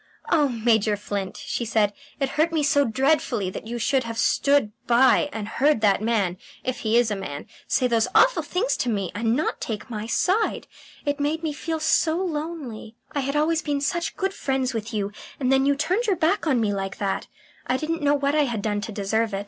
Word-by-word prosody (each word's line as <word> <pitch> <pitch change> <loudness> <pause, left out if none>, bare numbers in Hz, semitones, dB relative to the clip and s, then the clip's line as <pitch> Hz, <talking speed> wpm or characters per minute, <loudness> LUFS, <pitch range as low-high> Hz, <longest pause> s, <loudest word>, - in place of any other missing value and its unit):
"Oh, 300 -4 +4
Major 220 -3 +2
Flint," 200 -2 -4
she - - -3
said, 215 -2 +1 0.3
"it 275 -1 0
hurt 315 +4 +1
me 315 -2 +1
so 285 0 +3
dreadfully 245 -5 +1
that 220 - -7
you 240 +1 -4
should 260 +3 +1
have 230 -1 -6
stood 280 -1 +2 0.2
by 260 +4 +4
and 220 -4 -5
heard 280 +2 +2
that 200 -2 +3
man 210 -5 0 0.3
if 255 -1 -3
he 220 +1 +2
is 240 -2 +3
a - - 0
man 190 -8 -6 0.2
say 255 - +2
those 230 -2 +2
awful - - +5
things 435 +8 -1
to 250 - -1
me 200 -5 -1
and 225 +2 0
not 305 - -1
take 220 +2 -5
my 215 0 -4
side. 380 - +1 0.4
It 285 0 -1
made 305 +3 -1
me 310 -2 -1
feel 320 +2 -3
so 320 +1 +2
lonely. 300 -10 -4 0.2
I 285 - -2
had 275 +1 -2
always 315 +2 +2
been 290 -2 -1
such 335 +5 -2
good 385 0 -1
friends 265 -6 -1
with 225 0 -4
you, 205 -2 -2 0.3
and 260 -2 +1
then 270 +1 +4
you 285 - +3
turned 365 +11 0
your 400 - +3
back 340 +2 +1
on 265 -5 +3
me 210 -3 +1
like 195 -1 -4
that. 195 -1 -2 0.4
I 255 - +1
didn't 320 +3 -2
know 290 0 +3
what 280 0 0
I 300 -1 +3
had 230 -6 -3
done 205 -1 -1
to 220 - -5
deserve 215 +1 -1
it. - - -2
255 Hz, 220 wpm, -24 LUFS, 220-300 Hz, 0.4 s, awful